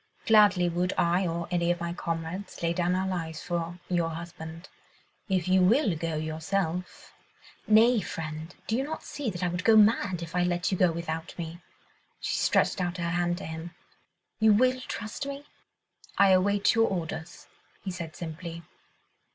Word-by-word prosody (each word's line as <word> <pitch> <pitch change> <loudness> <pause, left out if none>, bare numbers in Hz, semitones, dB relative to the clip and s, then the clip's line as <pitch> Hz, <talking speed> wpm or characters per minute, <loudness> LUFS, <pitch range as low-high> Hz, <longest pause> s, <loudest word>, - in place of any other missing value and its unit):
Gladly 205 -5 +5
would 175 +1 0
I 175 +2 +2
or 170 0 -3
any 170 -1 +1
of 175 0 +1
my 170 0 -3
comrades 170 +3 -5
lay 170 0 +2
down 175 +1 +1
our 190 +1 0
lives 165 -4 -4
for 170 0 -3
your 170 -2 +1
husband. 165 +1 -8 0.6
If 185 -3 +1
you 185 0 +4
will 205 - +4
go 165 0 -3
yourself.. 160 +3 -3 0.3
." - - -25
"Nay, 225 +2 +6
friend, 160 0 -6
do 220 - 0
you 260 - +1
not 315 +3 -5
see 285 -5 -4
that 180 -2 -5
I - - +2
would 175 +1 -3
go 225 - +6
mad 205 -4 +4
if 170 +1 -8
I 180 - +3
let 175 +1 0
you 190 - 0
go 180 -2 +5
without 165 0 -5
me?" 170 0 -6 0.6
She - - -2
stretched - - +2
out 180 0 -2
her 170 -1 -2
hand 175 0 0
to - - -7
him. 160 +1 -7 0.6
"You 220 -1 +6
will 255 +4 +3
trust 225 +6 -5
me?" 280 +1 -6 0.7
"I 200 -1 +6
await 200 +2 +4
your 225 0 +4
orders," 165 -2 -5 0.4
he 190 - -3
said 170 -3 -6
simply. 170 0 -7
175 Hz, 175 wpm, -28 LUFS, 165-195 Hz, 0.7 s, Nay